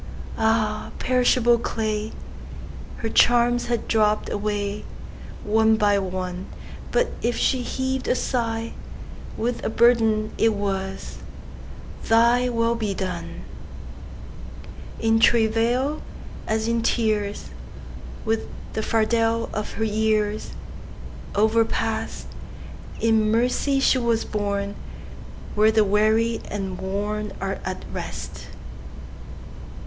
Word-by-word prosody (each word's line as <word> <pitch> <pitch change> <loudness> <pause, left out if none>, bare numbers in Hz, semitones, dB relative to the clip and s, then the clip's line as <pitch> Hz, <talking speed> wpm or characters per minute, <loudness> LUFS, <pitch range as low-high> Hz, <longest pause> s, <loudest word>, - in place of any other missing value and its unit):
Ah, 220 -1 +1
perishable 245 -2 +3
clay! 215 -2 -2 0.9
Her 225 - -3
charms 240 +1 +4
had 235 -1 -1
dropp'd 215 -1 +2
awayOne 210 +1 -1
by 205 -2 +3
one; 185 -1 -4 0.4
But - - +2
if 235 0 0
she 260 - +2
heav'd 260 +1 -2
a - - +3
sighWith 230 0 -4
a - - 0
burden, 220 -2 +3
it 225 -1 +3
was, 195 -1 -4 0.9
"ThyWill 235 0 +3
be 210 -3 -1
done."In 225 +3 -6
travail, 235 +6 +2 0.5
as 220 +1 0
in 230 0 +1
tears, 215 -3 0 0.7
With 225 0 0 0.3
the 220 - -1
fardel 225 +1 +1
of 210 0 -4
her 220 - -1 1.5
yearsOverpast, 225 +1 +1 0.8
In 220 -1 +3
mercy 250 +5 +2
she 270 -1 +3
was 235 -2 +1
borneWhere 200 -1 -2 1.0
the 220 -1 +4
weary 215 +3 +2
and 195 -2 -4
wornAre 200 0 -3
at - - -5
rest. - - -6
220 Hz, 90 wpm, -24 LUFS, 210-235 Hz, 1.5 s, charms